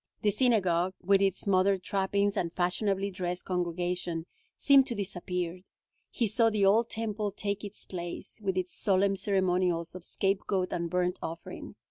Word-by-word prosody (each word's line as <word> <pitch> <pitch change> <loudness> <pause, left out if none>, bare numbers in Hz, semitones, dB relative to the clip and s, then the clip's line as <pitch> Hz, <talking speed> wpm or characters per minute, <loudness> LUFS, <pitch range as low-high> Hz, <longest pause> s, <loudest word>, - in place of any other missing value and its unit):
The 210 - +4
synagogue, 190 -6 +2
with 195 +1 +4
its 195 -2 0
modern 195 0 +3
trappings 200 +2 0
and 170 -2 -1
fashionably 195 +3 0
dressed 180 -1 -3
congregation, 175 -1 -2 0.3
seemed 275 -2 +6
to 240 - -2
disappear. 180 -3 -3 0.5
He 240 - 0
saw 225 +2 +3
the 210 -2 +2
old 220 +4 +4
Temple 215 -2 -2
take 200 0 -3
its 205 0 -6
place, 175 +3 -7
with 190 -2 -1
its 185 -1 -2
solemn 195 -1 +2
ceremonials 180 -3 +1
of 185 -1 -9
scapegoat 195 -1 -1
and 170 -1 -2
burnt 180 0 0
offering. 165 +1 -7
190 Hz, 150 wpm, -29 LUFS, 180-200 Hz, 0.5 s, seemed